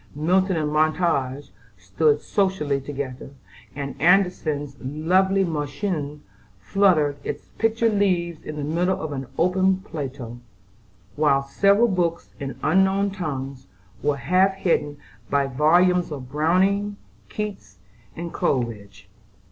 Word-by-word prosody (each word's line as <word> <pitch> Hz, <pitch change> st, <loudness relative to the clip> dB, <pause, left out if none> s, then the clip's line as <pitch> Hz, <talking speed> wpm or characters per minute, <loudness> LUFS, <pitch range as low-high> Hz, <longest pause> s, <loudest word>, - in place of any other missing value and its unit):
Milton 185 Hz, +4 st, +2 dB
and 150 Hz, -1 st, -1 dB
Montaigne 155 Hz, -4 st, +1 dB, 0.3 s
stood 145 Hz, -, +1 dB
socially 185 Hz, -9 st, 0 dB
together, 135 Hz, -2 st, -6 dB, 0.5 s
and 140 Hz, -1 st, -4 dB
Andersen's 165 Hz, -5 st, +2 dB
lovely 185 Hz, +8 st, +1 dB
"Märchen" 150 Hz, -1 st, -3 dB, 0.4 s
fluttered 155 Hz, -, +2 dB
its -, -, -6 dB
pictured 225 Hz, 0 st, +2 dB
leaves 170 Hz, -5 st, 0 dB
in 155 Hz, -, -7 dB
the 150 Hz, -, -4 dB
middle 175 Hz, +5 st, 0 dB
of 155 Hz, -1 st, -4 dB
an 135 Hz, -2 st, -5 dB
open 185 Hz, +2 st, +3 dB
Plato; 135 Hz, -, -7 dB, 0.8 s
while 140 Hz, -2 st, +3 dB
several 200 Hz, +11 st, +3 dB
books 175 Hz, -5 st, -1 dB
in 135 Hz, -3 st, -5 dB
unknown 190 Hz, +1 st, +3 dB
tongues 135 Hz, -8 st, -5 dB, 0.3 s
were 145 Hz, -1 st, +1 dB
half 185 Hz, +6 st, +2 dB
hidden 150 Hz, -6 st, 0 dB, 0.3 s
by 140 Hz, -1 st, +2 dB
volumes 170 Hz, +6 st, +3 dB
of 130 Hz, -3 st, -7 dB
Browning, 190 Hz, +7 st, +1 dB, 0.3 s
Keats, 195 Hz, -, -6 dB, 0.4 s
and 170 Hz, 0 st, -6 dB
Coleridge. 105 Hz, -7 st, -2 dB
155 Hz, 115 wpm, -23 LUFS, 140-190 Hz, 0.8 s, open